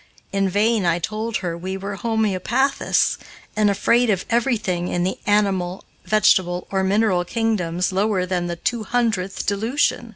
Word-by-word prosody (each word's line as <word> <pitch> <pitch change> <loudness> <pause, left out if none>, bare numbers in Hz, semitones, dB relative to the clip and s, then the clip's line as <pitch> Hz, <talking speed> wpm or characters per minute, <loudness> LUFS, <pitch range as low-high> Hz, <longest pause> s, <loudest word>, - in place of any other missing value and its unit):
In 195 -1 +1
vain 210 +2 +2
I 170 -1 +2
told 215 +5 -3
her 170 -1 -2
we 185 +3 -5
were 195 +1 -5
homeopathists, 225 +5 0 0.4
and 210 -1 +3
afraid 235 +4 +2
of 190 -3 0
everything 220 -8 0
in 175 -1 -1
the 185 - -2
animal, 195 -3 +1 0.2
vegetable, 185 -4 +2
or 190 -1 +1
mineral 190 -2 +2
kingdoms 180 -4 -1
lower 195 -1 +1
than 180 -1 -2
the 170 - -3
two 230 +6 -2
hundredth 215 -5 -1
dilution. 230 +3 0
200 Hz, 150 wpm, -21 LUFS, 180-225 Hz, 0.4 s, and